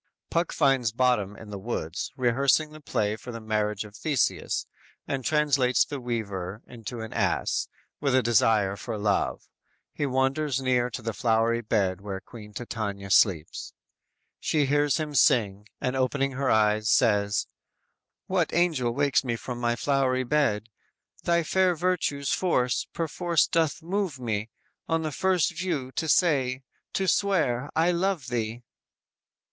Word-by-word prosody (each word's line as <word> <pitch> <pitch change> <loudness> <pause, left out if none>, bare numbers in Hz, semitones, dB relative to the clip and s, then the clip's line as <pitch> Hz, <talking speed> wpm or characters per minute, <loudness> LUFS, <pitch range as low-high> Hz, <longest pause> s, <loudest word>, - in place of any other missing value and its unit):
"_ - - -63
Puck 170 +1 +1
finds 135 -6 +2
Bottom 115 -5 +1
in 105 -2 -11
the 100 - -5
woods, 95 -6 -4
rehearsing 135 +5 +2
the 155 0 -12
play 105 -6 -1
for 115 +3 -9
the 115 - -6
marriage 105 -1 -1
of 105 0 -13
Theseus, 145 -1 0 0.4
and 135 -2 -2
translates 140 -4 +3
the 145 -3 -6
weaver 105 -5 -4
into 115 0 -8
an 110 - -7
ass, - - 0 0.3
with 140 -3 +1
a 130 - +4
desire 110 -3 +3
for 110 +2 -5
love. 105 -1 0 0.5
He 145 - -1
wanders 135 +2 0
near 125 -2 +1
the 115 -1 -4
flowery 115 +1 +1
bed 95 -4 0
where 100 -1 -5
Queen 105 0 -12
Titania 100 -3 -5
sleeps. 85 -7 +2 0.7
She 150 -2 +1
hears 145 0 +2
him 155 -2 -3
sing, 105 -6 +3
and 125 +1 -1
opening 135 +1 +1
her 135 0 -1
eyes, 110 0 +3
says: 105 -4 +3 0.8
_"What - - 0
angel 150 -9 +1
wakes 140 0 +2
me 120 -3 -1
from 120 +1 -6
my 120 -1 +1
flowery 130 -1 +1
bed? 120 -6 +1 0.6
Thy 170 0 +3
fair 185 +2 +2
virtue's 160 -5 0
force 125 -9 +1
perforce 170 0 +1
doth 165 0 0
move 180 -5 -2
me, 110 -2 -2 0.4
On 165 0 +1
the 155 - -2
first 180 +2 +1
view, 160 -7 -2
to 160 +3 -2
say, 135 -7 +2 0.3
to 190 - 0
swear, 150 -11 +1
I 165 +2 +3
love 175 -6 -1
thee!" 115 0 -3
125 Hz, 150 wpm, -27 LUFS, 110-150 Hz, 0.8 s, a